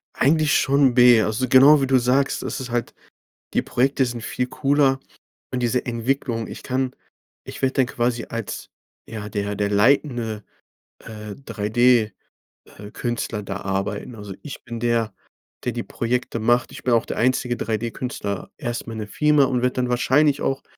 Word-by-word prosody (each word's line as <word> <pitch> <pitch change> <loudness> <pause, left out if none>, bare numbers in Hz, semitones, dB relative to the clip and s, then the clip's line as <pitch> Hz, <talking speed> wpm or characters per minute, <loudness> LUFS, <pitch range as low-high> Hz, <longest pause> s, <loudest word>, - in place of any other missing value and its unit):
Eigentlich 155 +1 +3
schon 135 -2 +3
B. 120 -2 +7
Also, 110 +4 -1
genau 140 +4 +7
wie 135 - +1
du 130 - +4
sagst. 130 +3 +1
Das - - -4
ist 130 - -6
halt 120 0 -2 0.6
die - - +2
Projekte 135 +2 +1
sind 120 -2 -5
viel 125 +2 -2
cooler. 135 0 +2 0.5
Und 125 - -1
diese 120 +1 0
Entwicklung 120 -1 -2
ich - - -9
kann 130 0 -1 0.5
ich - - -9
werde 135 0 +1
dann 130 - +3
quasi 120 -1 -1
als, 115 -2 -5 0.4
ja, 110 -2 -6
der 105 -1 -2
der 100 0 -1
leitende, 115 -1 +1 0.6
äh, 105 -2 -9
3D, 115 -1 +2 0.7
äh, 105 0 -9
Künstler 120 -3 -3
da 100 0 -5
arbeiten. 100 +4 -3
Also, 105 -3 -8
ich 150 - -8
bin 120 -1 -6
der, 115 -3 0 0.5
der 125 - -1
die 120 +1 -3
Projekte 120 0 -2
macht. 120 +2 +2
Ich - - -10
bin 125 - +2
auch 115 - +2
der - - -4
einzige 125 0 +1
3D-Künstler 110 -2 -4
erst 120 -5 -4
mal 115 - -6
in 110 - -6
der 105 - -6
Firma 150 +4 +3
und 125 -2 0
werde 125 0 +1
dann 125 -1 -1
wahrscheinlich 140 +4 +2
auch, 135 0 -1
120 Hz, 175 wpm, -22 LUFS, 110-130 Hz, 0.7 s, B